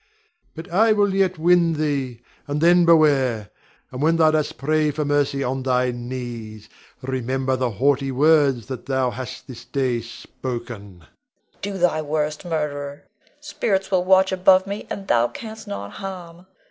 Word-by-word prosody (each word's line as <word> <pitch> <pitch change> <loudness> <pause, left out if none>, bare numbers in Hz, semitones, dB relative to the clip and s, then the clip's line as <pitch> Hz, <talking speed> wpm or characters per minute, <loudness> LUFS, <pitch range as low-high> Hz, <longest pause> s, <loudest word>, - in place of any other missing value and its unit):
But 165 +2 -8
I 215 +5 +4
will 205 -2 +2
yet 190 -2 +1
win 170 0 +3
thee, 140 -6 -2 0.2
and 145 +1 -2
then 175 +2 +5
beware! 135 - +3 0.4
And 125 - -6
when 160 +2 +3
thou 160 -1 +5
dost 155 -1 -1
pray 155 +2 +1
for 150 +1 -2
mercy 145 -1 0
on 130 +1 -2
thy 125 -1 +1
knees, 120 -3 -7 0.4
remember 130 0 -1
the 130 -1 -1
haughty 135 +5 +1
words 140 -4 +3
thou 130 0 -2
hast 130 +1 -7
this 130 -4 -10
day 130 -4 -1
spoken. 120 -1 -7 0.2
Leonore. 80 - -22 0.5
Do 200 0 -4
thy 175 -3 +1
worst, 150 0 -2
murderer; 145 -3 -4 0.4
spirits 195 -10 -2
will 185 -2 +2
watch 190 +1 +4
above 190 0 +4
me, 200 +1 -6
and 195 -1 -6
thou 120 -5 +3
canst 220 - -9
not 100 0 -6
harm. 180 -2 -9
145 Hz, 155 wpm, -22 LUFS, 130-175 Hz, 0.5 s, then